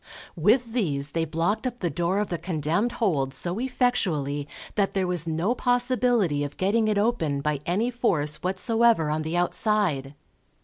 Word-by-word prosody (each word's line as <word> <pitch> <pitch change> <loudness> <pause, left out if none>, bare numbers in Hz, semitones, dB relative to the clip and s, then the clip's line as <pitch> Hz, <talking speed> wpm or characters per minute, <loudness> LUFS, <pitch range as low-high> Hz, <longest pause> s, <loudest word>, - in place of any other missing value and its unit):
With 225 - +2
these 145 - 0
they 165 +1 0
blocked 170 - -1
up 245 - -5
the 175 - -1
door 175 +2 0
of 210 0 -1
the 170 - -3
condemned 170 +6 -1
hold 140 - 0
so 175 +7 -1
effectually 180 - 0 0.3
that 200 -2 0
there 190 -1 0
was 175 -2 -2
no 165 +8 0
possibility 245 - +1
of 145 0 -6
getting 215 +4 +1
it 210 -1 +1
open 200 -10 0
by 150 0 -1
any 215 +8 +1
force 160 -12 0
whatsoever 190 0 +2
on 155 +1 -1
the 160 +2 -2
outside. 175 -7 0
180 Hz, 165 wpm, -25 LUFS, 155-225 Hz, 0.3 s, With